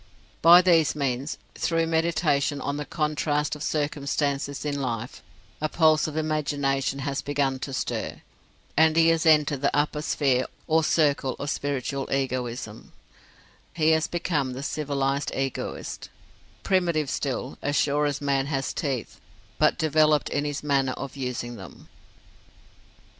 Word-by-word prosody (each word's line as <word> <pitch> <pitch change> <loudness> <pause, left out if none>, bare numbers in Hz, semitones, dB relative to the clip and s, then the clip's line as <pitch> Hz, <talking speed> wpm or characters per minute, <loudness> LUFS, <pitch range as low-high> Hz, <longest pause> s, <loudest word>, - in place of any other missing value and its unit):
By 175 +2 +8
these 165 -5 +4
means, 135 0 -2 0.2
through 165 -1 0
meditation 160 -3 +1
on 140 +1 -3
the 150 - -4
contrast 150 -1 -1
of 150 - -11
circumstances 140 0 -1
in 145 -1 -2
life, 120 -2 -4 0.4
a 155 - 0
pulse 155 -2 +3
of 155 0 -5
imagination 145 -3 0
has 140 -1 -2
begun 140 -2 -1
to 135 - -5
stir, 130 - -3 0.5
and 160 +1 +4
he 165 0 +6
has 165 0 +2
entered 150 -3 +4
the 140 0 +1
upper 150 0 0
sphere 135 -4 +1 0.2
or 160 0 +2
circle 145 -5 +2
of 140 0 -3
spiritual 140 -1 -3
Egoism: 125 -4 -3 0.8
he 160 -1 +3
has 160 0 +2
become 155 -7 -1
the 130 +2 -6
civilized 140 -2 -1
Egoist; 135 -1 -4 0.5
primitive 170 -6 +1
still, 135 -1 -3
as 145 +1 -1
sure 145 +1 +2
as 145 -1 -2
man 140 -1 +1
has 135 -2 -2
teeth, 135 -6 -4 0.4
but - - +3
developed 155 -3 +3
in 145 0 -1
his 145 0 -3
manner 135 -3 +1
of 140 0 -7
using 125 -3 -4
them. 95 -7 -12
145 Hz, 140 wpm, -26 LUFS, 135-155 Hz, 0.8 s, By